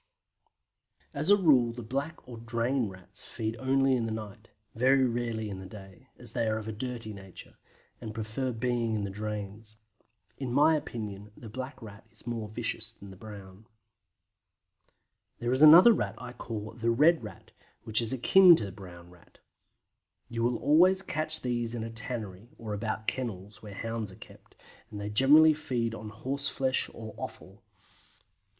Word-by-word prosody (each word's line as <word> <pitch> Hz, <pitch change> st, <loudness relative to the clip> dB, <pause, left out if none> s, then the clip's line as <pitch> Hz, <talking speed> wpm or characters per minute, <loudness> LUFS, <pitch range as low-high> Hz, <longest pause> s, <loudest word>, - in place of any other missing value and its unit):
As 150 Hz, +5 st, -2 dB
a 205 Hz, -, +7 dB
rule 130 Hz, -11 st, +4 dB
the 120 Hz, 0 st, -8 dB
Black 140 Hz, +8 st, -4 dB
or 120 Hz, -2 st, -9 dB
Drain 115 Hz, +1 st, -1 dB
Rats 95 Hz, -1 st, -7 dB
feed 110 Hz, 0 st, -3 dB
only 135 Hz, +1 st, +2 dB
in 115 Hz, -2 st, -1 dB
the -, -, -4 dB
night, 110 Hz, +1 st, -7 dB, 0.2 s
very 130 Hz, +3 st, +4 dB
rarely 115 Hz, -2 st, -2 dB
in 100 Hz, -2 st, -6 dB
the 95 Hz, -, -9 dB
day, 95 Hz, -3 st, -13 dB
as -, -, -8 dB
they 115 Hz, -, 0 dB
are 110 Hz, 0 st, 0 dB
of 110 Hz, 0 st, -6 dB
a -, -, -3 dB
dirty 115 Hz, -1 st, -5 dB
nature, 95 Hz, -2 st, -13 dB, 0.4 s
and 110 Hz, -, -6 dB
prefer 115 Hz, +4 st, -3 dB
being 120 Hz, -1 st, -1 dB
in 105 Hz, -, -2 dB
the 100 Hz, -, -4 dB
drains. 105 Hz, +1 st, -6 dB, 0.6 s
In 130 Hz, -3 st, -3 dB
my 150 Hz, +5 st, +5 dB
opinion 105 Hz, -7 st, -6 dB
the 115 Hz, -, -10 dB
Black 130 Hz, +4 st, -7 dB
Rat 105 Hz, 0 st, -12 dB
is 115 Hz, -1 st, -16 dB
more 115 Hz, -3 st, -4 dB
vicious 110 Hz, -, -3 dB
than 100 Hz, -1 st, -13 dB
the -, -, -11 dB
Brown. 100 Hz, 0 st, -12 dB, 1.7 s
There 120 Hz, 0 st, -2 dB
is 130 Hz, +2 st, +1 dB
another 170 Hz, +9 st, +10 dB
Rat -, -, -2 dB
I 125 Hz, -1 st, -8 dB
call 110 Hz, -3 st, -6 dB
the 115 Hz, 0 st, -2 dB
Red 150 Hz, +6 st, +4 dB
Rat, 105 Hz, -4 st, -11 dB, 0.3 s
which 110 Hz, +1 st, 0 dB
is 115 Hz, -, 0 dB
akin 175 Hz, +8 st, +7 dB
to 110 Hz, -, +2 dB
the 100 Hz, -, -7 dB
Brown 90 Hz, -2 st, -12 dB
Rat. 90 Hz, -1 st, -21 dB, 0.9 s
You 115 Hz, 0 st, -3 dB
will 120 Hz, +1 st, +1 dB
always 180 Hz, +6 st, +4 dB
catch 155 Hz, -3 st, 0 dB
these 120 Hz, -2 st, -2 dB
at 115 Hz, -, -4 dB
a 115 Hz, -, -6 dB
tannery, 115 Hz, -3 st, -5 dB
or 110 Hz, -2 st, -6 dB
about 110 Hz, +1 st, -3 dB
kennels, 105 Hz, -6 st, -5 dB
where 105 Hz, -2 st, -10 dB
hounds 115 Hz, -2 st, -4 dB
are -, -, -13 dB
kept, 110 Hz, -, -16 dB, 0.3 s
and 105 Hz, -, -7 dB
they 105 Hz, 0 st, -4 dB
generally 150 Hz, +8 st, +6 dB
feed 120 Hz, -6 st, -2 dB
on 110 Hz, -1 st, -7 dB
horseflesh 135 Hz, +3 st, 0 dB
or 110 Hz, -1 st, -9 dB
offal. -, -, -9 dB
115 Hz, 170 wpm, -29 LUFS, 105-130 Hz, 1.7 s, another